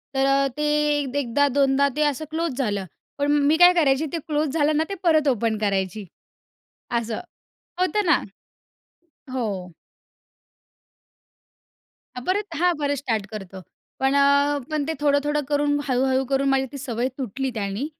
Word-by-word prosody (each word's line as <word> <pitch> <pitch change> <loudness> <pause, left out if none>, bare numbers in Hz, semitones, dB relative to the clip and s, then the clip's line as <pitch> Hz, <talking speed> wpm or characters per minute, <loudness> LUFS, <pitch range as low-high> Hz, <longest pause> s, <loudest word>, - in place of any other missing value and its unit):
तर 270 0 +2
अ, 275 0 +3
ते 295 -1 +1
अ, 265 +2 -4
1दा 285 +2 +2
2दा 275 0 +3
ते 300 - +1
असं 295 +2 -1
क्लोज 320 -4 -2
झालं. 205 -7 -1 0.3
पण 285 +1 +1
मी 295 +2 +3
काय 355 +1 +8
करायची 300 -3 +2
ते - - 0
क्लोज 300 -1 0
झालं 300 -1 +2
ना 315 - +3
ते 395 - -3
परत 310 -4 +3
ओपन 230 -3 +1
करायची 200 0 -1 0.9
असं. 230 -1 -4 0.6
होतं 410 +3 +1
ना. - - +3 1.1
हो. 200 -8 -3 2.5
परत 400 +5 -1
हां, 350 +2 +2
परत 285 -1 0
स्टार्ट 225 -6 -2
करतो. 195 -3 -8 0.4
पण 270 +1 +2
अ, 280 +1 +3
पण 305 -2 -1
ते - - 0
थोडं-थोडं 295 +1 +2
करून, 290 0 +1
हळू-हळू 260 +1 +1
करून 275 0 +1
माझी 265 0 +2
ती 280 - -6
सवय 250 -2 -2
तुटली 265 +2 -3
त्यानी 205 +5 -3
280 Hz, 145 wpm, -23 LUFS, 245-295 Hz, 2.5 s, काय